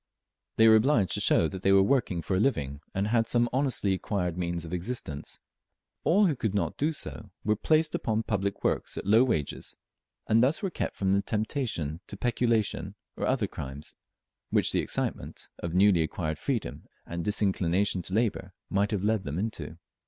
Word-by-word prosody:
They 110 Hz, -, +6 dB
were 110 Hz, 0 st, +8 dB
obliged 110 Hz, -, +2 dB
to -, -, +1 dB
show 80 Hz, -, +4 dB
that 95 Hz, +2 st, -7 dB
they 95 Hz, -, +3 dB
were 95 Hz, 0 st, +6 dB
working 100 Hz, -7 st, +1 dB
for 95 Hz, -, -1 dB
a -, -, +2 dB
living, 70 Hz, -, 0 dB
and 100 Hz, +2 st, -1 dB
had 115 Hz, 0 st, +2 dB
some 120 Hz, 0 st, +2 dB
honestly 130 Hz, -7 st, +1 dB
acquired 90 Hz, -2 st, -2 dB
means 85 Hz, -1 st, -3 dB
of 80 Hz, -, -7 dB
existence. 90 Hz, -, -4 dB, 0.7 s
All 200 Hz, +5 st, +4 dB
who 160 Hz, -6 st, +2 dB
could 110 Hz, -5 st, -2 dB
not 100 Hz, -, 0 dB
do 150 Hz, +3 st, 0 dB
so 155 Hz, -, -6 dB, 0.2 s
were 105 Hz, +1 st, +3 dB
placed 155 Hz, +7 st, +2 dB
upon 110 Hz, 0 st, 0 dB
public 100 Hz, -2 st, -2 dB
works -, -, -1 dB
at -, -, -5 dB
low 110 Hz, +5 st, +6 dB
wages, 80 Hz, -, -2 dB, 0.5 s
and 110 Hz, +1 st, +4 dB
thus 140 Hz, -, +2 dB
were 195 Hz, -, -1 dB
kept -, -, -3 dB
from 95 Hz, -1 st, +1 dB
the 100 Hz, -, +3 dB
temptation 105 Hz, -, -2 dB
to -, -, -7 dB
peculation 115 Hz, -5 st, 0 dB, 0.2 s
or -, -, -2 dB
other -, -, +1 dB
crimes, 70 Hz, +2 st, -7 dB, 0.6 s
which -, -, +3 dB
the -, -, +1 dB
excitement -, -, -3 dB
of 85 Hz, 0 st, -4 dB
newly 95 Hz, -2 st, +5 dB
acquired 80 Hz, -1 st, -2 dB
freedom, 130 Hz, -6 st, -3 dB, 0.2 s
and 85 Hz, 0 st, -4 dB
disinclination 95 Hz, -2 st, +1 dB
to 90 Hz, -, -7 dB
labour, 105 Hz, -5 st, -1 dB, 0.2 s
might 100 Hz, +1 st, +2 dB
have 105 Hz, -4 st, -2 dB
led 110 Hz, -1 st, +1 dB
them 70 Hz, +2 st, -4 dB
into. 85 Hz, -6 st, -4 dB
100 Hz, 185 wpm, -28 LUFS, 90-115 Hz, 0.7 s, were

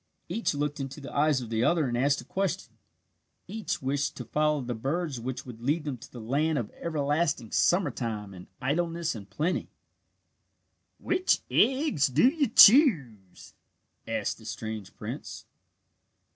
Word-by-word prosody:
Each 195 Hz, -3 st, -1 dB
looked 145 Hz, 0 st, -2 dB
into 135 Hz, +1 st, -5 dB
the 140 Hz, -, -9 dB
eyes 145 Hz, -2 st, +3 dB
of 115 Hz, -2 st, -8 dB
the 110 Hz, +1 st, +1 dB
other 165 Hz, -2 st, +2 dB
and 120 Hz, -, -2 dB
asked 140 Hz, +2 st, +1 dB
a -, -, -15 dB
question. 195 Hz, +1 st, -3 dB, 0.7 s
Each 215 Hz, -6 st, -4 dB
wished 140 Hz, +1 st, -1 dB
to 125 Hz, -, -6 dB
follow 150 Hz, +3 st, +1 dB
the 125 Hz, -1 st, -4 dB
birds 140 Hz, +4 st, -2 dB
which 125 Hz, +2 st, -5 dB
would 120 Hz, -3 st, -10 dB
lead 150 Hz, +6 st, 0 dB
them 145 Hz, -4 st, -4 dB
to -, -, -13 dB
the 120 Hz, -, -9 dB
land 145 Hz, +7 st, 0 dB
of 115 Hz, -, -3 dB
everlasting 145 Hz, -6 st, -1 dB
summer 180 Hz, +1 st, +2 dB
time 105 Hz, -5 st, -5 dB
and 90 Hz, -1 st, -11 dB
idleness 165 Hz, +4 st, -1 dB
and 100 Hz, -4 st, -10 dB
plenty. 170 Hz, +5 st, -2 dB, 1.3 s
"Which 365 Hz, +1 st, +1 dB
eggs 265 Hz, -, +3 dB
do 135 Hz, -, +4 dB
you 285 Hz, 0 st, +2 dB
choose?" 155 Hz, -, +5 dB, 0.5 s
asked -, -, -2 dB
the -, -, -15 dB
strange 110 Hz, -3 st, -6 dB
prince. -, -, -7 dB
145 Hz, 155 wpm, -28 LUFS, 120-170 Hz, 1.3 s, choose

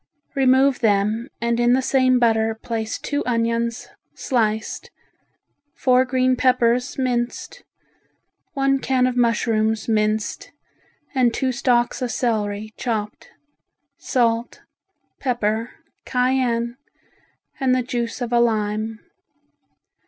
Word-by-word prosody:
Remove 265 Hz, 0 st, +3 dB
them 215 Hz, +2 st, +1 dB
and 235 Hz, 0 st, 0 dB
in 240 Hz, 0 st, +4 dB
the 260 Hz, -, +3 dB
same 255 Hz, -1 st, +3 dB
butter 225 Hz, -2 st, +2 dB
place 220 Hz, 0 st, -4 dB
two 285 Hz, 0 st, -3 dB
onions, 230 Hz, -1 st, -1 dB, 0.3 s
sliced, 220 Hz, -4 st, -1 dB, 0.9 s
four 255 Hz, 0 st, +3 dB
green 255 Hz, 0 st, +2 dB
peppers 250 Hz, -1 st, +2 dB
minced, 245 Hz, -2 st, -2 dB, 0.9 s
one 275 Hz, -1 st, +1 dB
can 260 Hz, -1 st, +1 dB
of 255 Hz, -1 st, 0 dB
mushrooms 225 Hz, -2 st, +1 dB
minced, 215 Hz, -1 st, -1 dB, 0.6 s
and 250 Hz, -4 st, +2 dB
two 265 Hz, -1 st, 0 dB
stalks 245 Hz, -1 st, +1 dB
of 250 Hz, -, -1 dB
celery 215 Hz, -3 st, -2 dB
chopped; 215 Hz, -4 st, -4 dB, 0.7 s
salt, 235 Hz, -2 st, 0 dB, 0.6 s
pepper, 230 Hz, -3 st, -1 dB, 0.3 s
cayenne, 250 Hz, -2 st, 0 dB, 0.8 s
and 260 Hz, -2 st, +2 dB
the 255 Hz, -, 0 dB
juice 240 Hz, -1 st, -3 dB
of 240 Hz, 0 st, -3 dB
a 240 Hz, -, +4 dB
lime. 215 Hz, -1 st, 0 dB
240 Hz, 105 wpm, -22 LUFS, 225-255 Hz, 0.9 s, in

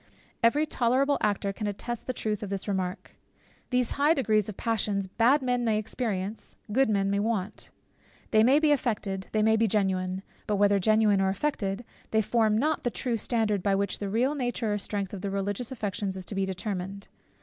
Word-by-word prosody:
Every 285 Hz, +6 st, +4 dB
tolerable 270 Hz, +1 st, +1 dB
actor 200 Hz, -1 st, 0 dB
can 210 Hz, +1 st, -4 dB
attest 225 Hz, +3 st, -4 dB
the -, -, +1 dB
truth 215 Hz, -3 st, -2 dB
of 205 Hz, -, -5 dB
this 195 Hz, +1 st, -4 dB
remark. 185 Hz, -2 st, -3 dB, 0.5 s
These 250 Hz, -2 st, +1 dB
high 295 Hz, +3 st, +3 dB
degrees 215 Hz, -, +1 dB
of 210 Hz, -, -6 dB
the -, -, -12 dB
passions 205 Hz, -4 st, 0 dB
bad 245 Hz, +8 st, +3 dB
men 245 Hz, -1 st, +1 dB
may 220 Hz, -2 st, +2 dB
experience, 215 Hz, -2 st, -3 dB, 0.2 s
good 265 Hz, +2 st, +3 dB
men 195 Hz, -2 st, +1 dB
may 200 Hz, -, +1 dB
want. 210 Hz, -2 st, -2 dB, 0.6 s
They 215 Hz, -, +5 dB
may 260 Hz, +5 st, +5 dB
be 305 Hz, -1 st, +3 dB
affected; 210 Hz, -8 st, -1 dB
they 215 Hz, -1 st, +2 dB
may 220 Hz, +1 st, +4 dB
be 225 Hz, 0 st, +3 dB
genuine; 190 Hz, -2 st, 0 dB, 0.2 s
but 210 Hz, -, +1 dB
whether 200 Hz, 0 st, +4 dB
genuine 215 Hz, 0 st, +3 dB
or 190 Hz, -, +2 dB
affected, 200 Hz, -1 st, -2 dB, 0.2 s
they 220 Hz, 0 st, +2 dB
form 220 Hz, -1 st, +2 dB
not 305 Hz, +6 st, +1 dB
the 245 Hz, -, 0 dB
true 240 Hz, 0 st, -2 dB
standard 220 Hz, -3 st, +1 dB
by 195 Hz, +1 st, +2 dB
which 200 Hz, -1 st, -1 dB
the 200 Hz, -, -3 dB
real 245 Hz, +7 st, +1 dB
nature 245 Hz, -5 st, -1 dB
or 205 Hz, -, -1 dB
strength 200 Hz, -1 st, -3 dB
of 195 Hz, -, -5 dB
the 200 Hz, -, -2 dB
religious 200 Hz, +4 st, -2 dB
affections 205 Hz, -5 st, -3 dB
is 185 Hz, -, -6 dB
to -, -, -6 dB
be 195 Hz, -1 st, 0 dB
determined. 190 Hz, 0 st, -4 dB
215 Hz, 200 wpm, -28 LUFS, 195-240 Hz, 0.6 s, They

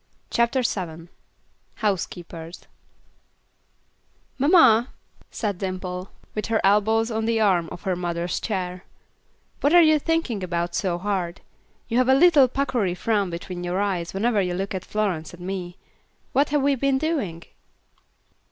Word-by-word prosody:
CHAPTER 235 Hz, +2 st, +2 dB
VII 170 Hz, -6 st, -3 dB, 0.7 s
Housekeepers 175 Hz, -4 st, -4 dB, 1.8 s
"Mamma," 265 Hz, -6 st, +6 dB, 0.4 s
said 205 Hz, -5 st, -3 dB
Dimple, 185 Hz, -1 st, -4 dB, 0.2 s
with 215 Hz, -, -3 dB
her 225 Hz, -1 st, +1 dB
elbows 220 Hz, +3 st, +3 dB
on 220 Hz, 0 st, -1 dB
the 230 Hz, 0 st, +1 dB
arm 180 Hz, -6 st, +2 dB
of -, -, -9 dB
her 190 Hz, -3 st, 0 dB
mother's 175 Hz, 0 st, -2 dB
chair, 185 Hz, -4 st, -3 dB, 0.8 s
"what 290 Hz, +4 st, +3 dB
are 350 Hz, -, +9 dB
you 310 Hz, -1 st, +5 dB
thinking 325 Hz, -, -1 dB
about 170 Hz, -1 st, -2 dB
so 180 Hz, -2 st, -1 dB
hard? 185 Hz, -2 st, -3 dB, 0.5 s
You 235 Hz, +1 st, +1 dB
have 255 Hz, 0 st, +2 dB
a 265 Hz, -, +6 dB
little 295 Hz, -3 st, +6 dB
puckery 245 Hz, -8 st, -1 dB
frown 205 Hz, 0 st, 0 dB
between 175 Hz, +1 st, -6 dB
your 175 Hz, +2 st, -1 dB
eyes, 185 Hz, -4 st, -1 dB
whenever 210 Hz, +2 st, +1 dB
you 180 Hz, -1 st, -1 dB
look 195 Hz, +2 st, -3 dB
at 185 Hz, -1 st, -4 dB
Florence 185 Hz, -7 st, -2 dB
and 175 Hz, 0 st, -10 dB
me. 180 Hz, -2 st, -5 dB, 0.6 s
What 280 Hz, +3 st, +3 dB
have 295 Hz, -1 st, +1 dB
we 280 Hz, 0 st, +3 dB
been 275 Hz, +1 st, +1 dB
doing?" 265 Hz, -, -2 dB
200 Hz, 145 wpm, -24 LUFS, 180-240 Hz, 1.8 s, are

